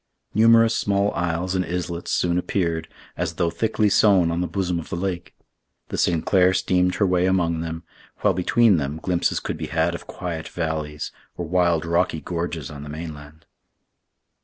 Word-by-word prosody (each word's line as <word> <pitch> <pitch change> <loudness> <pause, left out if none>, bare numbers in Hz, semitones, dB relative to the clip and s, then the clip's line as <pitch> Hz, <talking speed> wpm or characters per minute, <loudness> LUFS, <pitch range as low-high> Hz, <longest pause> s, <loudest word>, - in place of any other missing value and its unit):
Numerous 115 +1 +5
small 100 0 +1
isles 85 +1 -1
and 95 -1 +1
islets 85 -1 -4
soon 90 0 +1
appeared, 85 -4 -1 0.3
as 85 -1 -3
though 85 -1 0
thickly 110 +1 +1
sown 95 -4 +4
on 85 +1 -1
the 90 - -1
bosom 90 -3 -1
of 80 - -9
the - - -3
lake. 90 0 -4 0.5
The - - -3
Sinclair 90 +2 +3
steamed 90 0 +2
her 100 - +2
way 90 -1 +2
among 85 -3 +1
them, 80 0 -5 0.4
while 105 - +3
between 100 +3 +3
them 70 0 -2
glimpses 85 +1 0
could - - -4
be - - -4
had 80 +1 +1
of 85 - -8
quiet 85 -4 -5
valleys, 80 -3 -3 0.3
or 85 - -3
wild 85 -1 +2
rocky 85 0 +1
gorges 85 -4 -4
on 70 -1 -8
the 75 - -8
mainland. 75 -1 -8
85 Hz, 170 wpm, -23 LUFS, 80-95 Hz, 0.5 s, Numerous